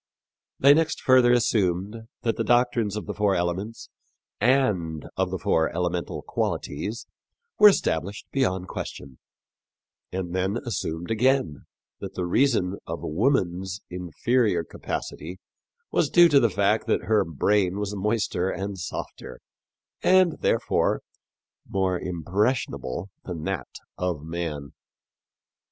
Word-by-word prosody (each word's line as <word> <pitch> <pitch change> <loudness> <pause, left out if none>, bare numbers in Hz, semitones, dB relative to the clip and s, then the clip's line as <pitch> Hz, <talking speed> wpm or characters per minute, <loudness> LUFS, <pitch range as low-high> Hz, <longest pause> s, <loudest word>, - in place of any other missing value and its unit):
They 140 +1 +7
next 160 +1 +1
further 130 -2 +5
assumed 105 -2 +1 0.2
that 115 - +1
the 115 - -1
doctrines 120 -3 +2
of 105 - -5
the 105 - -4
four 105 -2 +1
elements 90 +6 -3 0.5
and 105 - +1
of 95 -1 0
the 95 - -3
four 80 -2 +1
elemental 90 0 -2
qualities 105 - -3 0.5
were 210 - +10
established 100 - -1
beyond 95 -9 0
question, 65 -6 -7 0.9
and 90 -2 -4
then 95 +4 0
assumed 85 -6 -3
again 115 - +1 0.3
that - - -7
the 90 - -2
reason 100 -2 +2
of 85 +1 -5
woman's 95 - 0
inferior 90 +2 0
capacity 85 +1 -6 0.5
was 155 - +2
due 175 -1 +7
to 145 -2 +6
the 120 -3 +3
fact 100 +3 +1
that - - +1
her 110 -1 +3
brain 95 +4 +1
was 105 0 -3
moister 100 -3 0
and 95 +1 -4
softer, 85 - -6 0.6
and, 185 -3 +4
therefore, - - +1 0.7
more 95 -2 0
impressionable 90 - -2
than 85 -4 -5
that 95 0 -4 0.2
of 90 -5 -2
man. 80 -4 -4
95 Hz, 120 wpm, -25 LUFS, 85-115 Hz, 0.9 s, were